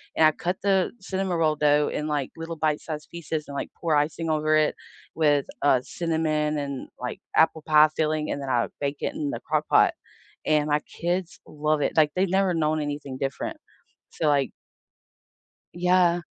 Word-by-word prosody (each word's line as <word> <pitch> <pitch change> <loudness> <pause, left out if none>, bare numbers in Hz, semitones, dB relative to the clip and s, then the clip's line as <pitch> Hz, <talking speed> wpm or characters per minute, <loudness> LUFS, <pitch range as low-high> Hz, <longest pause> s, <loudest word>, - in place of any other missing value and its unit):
and 160 - +5
I 155 - +6
cut 180 +4 -3
the 195 -2 +2
cinnamon 190 -2 -2
roll 155 -2 +2
dough 150 0 +3
in, 150 - -3
like, 145 -3 -2
little 165 0 -6
bite-sized 155 0 -2
pieces 160 -2 -4
and, 140 - -8
like, - - -4
pour 165 -3 0
icing 155 +3 0
over 155 0 +2
it 155 0 +2 0.4
with, 145 -3 +3 0.2
uh, 140 -3 +4
cinnamon 155 -1 -1
and, 140 -2 -4
like, 125 - -5
apple 160 0 +3
pie 155 0 +6
filling, 155 -1 0
and 140 - -3
then 135 - -5
I 120 -2 +2
bake 140 0 -1
it 285 - -2
in 300 -1 -3
the 295 - -4
Crock-Pot, - - +2 0.5
and 150 -1 +2
my 150 0 +2
kids 175 +2 -3
love 150 0 0
it. - - 0
Like, 150 -2 +4
they've 185 +1 +1
never 190 0 +2
known 155 -1 +1
anything 145 -2 -4
different. 140 - -3 0.5
So, 155 - -2
like 140 -2 +2 1.2
Yeah. 175 0 +3
155 Hz, 175 wpm, -25 LUFS, 150-170 Hz, 1.2 s, I